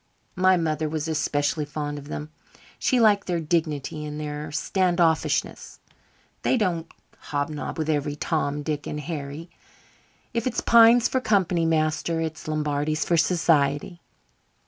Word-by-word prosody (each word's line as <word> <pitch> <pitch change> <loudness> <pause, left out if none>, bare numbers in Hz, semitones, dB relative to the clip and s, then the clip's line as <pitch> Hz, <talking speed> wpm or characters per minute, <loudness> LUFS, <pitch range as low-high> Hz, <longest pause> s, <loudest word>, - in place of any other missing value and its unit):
My 185 0 +4
mother 155 -2 -1
was 155 0 -3
especially 150 -1 0
fond 145 0 -4
of 145 - -12
them. 150 +1 -6 0.5
She 255 - +2
liked 210 -3 +4
their 175 -2 0
dignity 155 -2 -1
and 150 0 -6
their 150 0 -5
stand 180 +3 0
offishness. 160 -2 0 0.6
They 260 - +2
don't 175 -7 -1 0.4
hobnob 145 +1 -3
with 155 -1 -2
every 145 -1 0
Tom, 145 -2 -1
Dick 150 -1 -3
and 150 - -4
Harry. 150 +1 -6 0.8
If 230 +1 -1
it's 250 - -1
pines 235 +1 +6
for 260 - -1
company, 185 -7 +2
master, 160 +1 0
it's 160 -1 -4
Lombardies 155 0 -1
for 170 - +2
society." 165 -1 +1
155 Hz, 140 wpm, -25 LUFS, 150-175 Hz, 0.8 s, pines